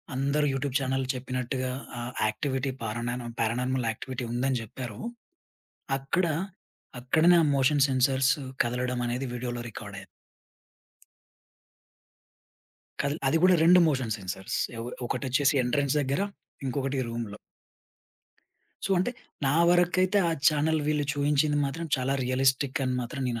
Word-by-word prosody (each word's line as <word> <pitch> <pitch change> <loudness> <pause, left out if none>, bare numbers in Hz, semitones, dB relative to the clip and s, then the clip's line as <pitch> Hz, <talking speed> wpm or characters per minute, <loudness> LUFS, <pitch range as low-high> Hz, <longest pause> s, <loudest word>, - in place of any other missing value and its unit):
అందరు 140 +3 +1
YouTube 135 0 -2
channel 135 0 -1
చెప్పినట్టుగా 130 0 -3 0.3
ఆ - - -4 0.3
యాక్టివిటీ 135 +4 -1
పారానార్మ 120 +2 -3
పారానార్మల్ 125 +2 0
యాక్టివిటీ 130 +2 -5
ఉందని 130 +1 +1
జెప్పారో, 115 0 -7 1.0
అక్కడ 155 +7 0 0.7
అక్కడనే 155 +8 +4
ఆ - - +3
మోషన్ 135 +1 +3
సెన్సార్స్ 130 +1 +3 0.3
కదలడమనేది 125 +1 -2
వీడియో‌లో 120 0 -4
రికార్డయింది. - - -9 3.0
కల్ 140 +1 -1
అది 160 - +2
కూడా 185 0 +6
రెండు 180 +2 +7
మోషన్ 130 -7 0
సెన్సార్స్ 95 0 -4 0.2
ఏవ్ 115 +1 -5 0.2
ఒకటోచ్చేసి 140 +4 +1
ఎంట్రెన్స్ 135 +3 +1
దగ్గర 140 +5 -1 0.5
ఇంకొకటి 135 +1 -1
రూమ్‌లో. 115 -3 -5 1.5
సో, - - -2
అంటే 185 +7 +1 0.4
నా 135 - +2 0.2
వరకైతే 180 +3 +3
ఆ - - +1 0.2
చానెల్ 155 +1 +1
వీళ్ళు 150 -1 +1
చూయించింది 145 +1 +2
మాత్రం 165 +4 -4
చాలా 130 +1 0
రియలిస్టిక్ 135 +2 +1
అని 130 - 0
మాత్రం 135 +3 -5
నేను 120 -1 -2
130 Hz, 115 wpm, -28 LUFS, 125-145 Hz, 3.0 s, రెండు